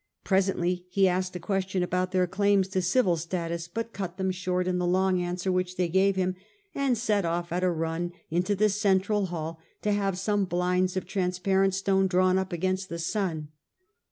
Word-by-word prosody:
Presently 180 -2 +1
he 195 +1 +3
asked 185 0 -1
a - - -3
ques 195 +1 -1
tion 185 -2 0
about 180 +1 -1
their 185 -1 +3
claims 195 +1 +2
to 190 -1 0
civil 180 -1 +2
status, 170 0 -3
but 230 +5 -5
cut 185 -3 -5
them 190 -1 0
short 180 0 -1
in 180 0 0
the 180 - 0
long 185 0 +2
answer 180 +1 -2
which 185 0 -1
they 180 -1 +1
gave 190 +3 +3
him, 185 -1 0 0.4
and 270 -4 +1
set 210 -3 +1
off 170 0 -2
at 180 +1 -1
a 185 - +3
run 165 +1 -2 0.2
into 180 +5 +1
the 215 +2 +3
central 200 0 +1
hall, 165 -2 -5 0.2
to 210 - +1
have 195 -2 0
some 205 +1 +1
blinds 180 +1 0
of 185 - -2
transpa 190 0 0
rent 195 -1 +2
stone 195 0 +2
drawn 185 0 +3
up 190 0 -3
against 185 +2 -1
the 170 - -4
sun. 165 -3 -2
185 Hz, 200 wpm, -27 LUFS, 180-195 Hz, 0.4 s, he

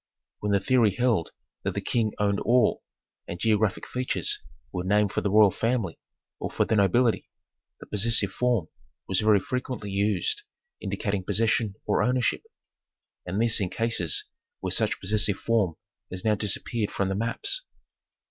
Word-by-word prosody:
When 105 - -1
the 100 - +4
theory 110 -1 +3
held 120 -9 +1 0.3
that - - -2
the - - 0
King 110 -3 0
owned 100 -1 +1
all, 120 -2 +3 0.5
and 85 - -6
geographic 105 -3 +1
features 125 0 -1 0.3
were 90 - -3
named 105 +1 +2
for - - -1
the 100 - 0
royal 105 0 +6
family 115 -5 -1 0.4
or - - -3
for - - +1
the 110 - +1
nobility, 110 +4 +2 0.5
the - - -10
possessive 105 -1 +1
form 120 -7 +1 0.4
was 95 - +1
very 105 -2 +5
frequently 125 -2 -4
used 105 - 0 0.4
indicating 100 -3 -2
possession 110 +1 +1
or - - +2
ownership, 125 -1 +1 0.9
and 90 +4 -2
this 115 -1 +3
in 95 - 0
cases 115 -6 -1 0.3
where - - -3
such - - +1
possessive 105 0 0
form 105 -8 +1 0.3
has 90 +2 -6
now 110 - +4
disappeared 105 +1 -2
from 100 -1 -1
the - - 0
maps... 400 - -1
105 Hz, 155 wpm, -27 LUFS, 100-115 Hz, 0.9 s, royal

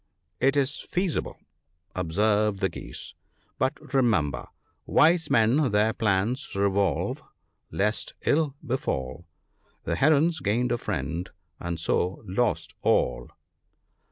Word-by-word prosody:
" 80 - -44
It 140 - -1
is 140 +1 0
feasible," 180 -2 -2 0.6
observed 105 +4 +1
the 95 - +1
Geese, - - -7 0.2
" - - -41
but 130 +1 -2
remember, 90 - +1 0.2
" - - -45
Wise 165 +2 +4
men 125 +6 +3
their 105 +2 +3
plans 110 +3 0
revolve, 100 -4 +1 0.5
lest 105 +2 -1
ill 145 -2 +2
befall; 85 - -3 0.6
The 85 - -2
Herons 155 - +3
gained 120 +2 0
a 120 - 0
friend, 90 -4 -3 0.3
and 85 -1 -4
so, 90 +4 0
lost 105 +4 -1
all." - - +1
105 Hz, 120 wpm, -26 LUFS, 90-135 Hz, 0.6 s, Wise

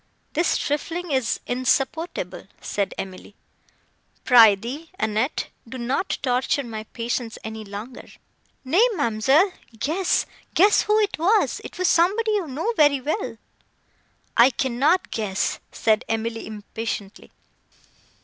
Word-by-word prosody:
"This 335 +3 +2
trifling 330 +4 -3
is 260 -4 0
insupportable," 255 - -1
said 200 -1 -2
Emily; 190 +1 -8 0.9
"pr'ythee, 240 +6 +5
Annette, 220 +6 -1 0.2
do 260 - -6
not 255 +9 -1
torture 255 +2 +1
my 220 -3 -6
patience 230 0 -4
any 220 0 -6
longer." 210 +5 -8 0.6
"Nay, 345 - +4
ma'amselle, 280 - +3 0.2
guess—guess 365 - +2
who 425 0 +2
it 405 -6 -1
was; 405 +7 +2
it - - -9
was 365 0 +1
somebody 410 +7 +3
you 405 -6 0
know 315 - -2
very 290 -5 +4
well." 305 - -3 1.0
"I 235 +2 +7
cannot 270 +8 +1
guess," 205 -3 -1
said 220 0 +1
Emily 225 0 -2
impatiently. 215 -1 -6
255 Hz, 110 wpm, -23 LUFS, 220-330 Hz, 1.0 s, I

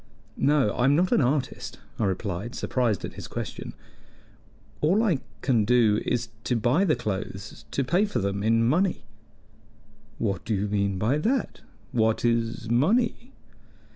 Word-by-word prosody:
"No, 140 -6 +3
I 125 - 0
am 140 +2 +5
not 180 +3 +2
an - - +4
artist," 125 -2 -1 0.2
I 110 - +2
replied, 100 +3 -3
surprised 120 -7 0
at - - -7
his - - -8
question. - - -6 1.0
"All 185 +9 +3
I 180 - +2 0.2
can 120 -5 +3
do 110 -2 +3
is 120 -1 -1 0.2
to 125 - +1
buy 120 - +2
the 155 - +3
clothes 95 -1 -5
to 140 - 0
pay 175 +11 +2
for 205 - -3
them 100 -2 -1
in 115 +2 +3
money." 180 +5 +1 1.1
"What 100 -5 -2
do 110 - -1
you 100 +2 -1
mean 100 -1 0
by 115 +10 +1
that? 240 - -1 0.3
What 110 -1 +1
is 115 -1 0
money?" 225 - +1
120 Hz, 155 wpm, -26 LUFS, 105-150 Hz, 1.1 s, am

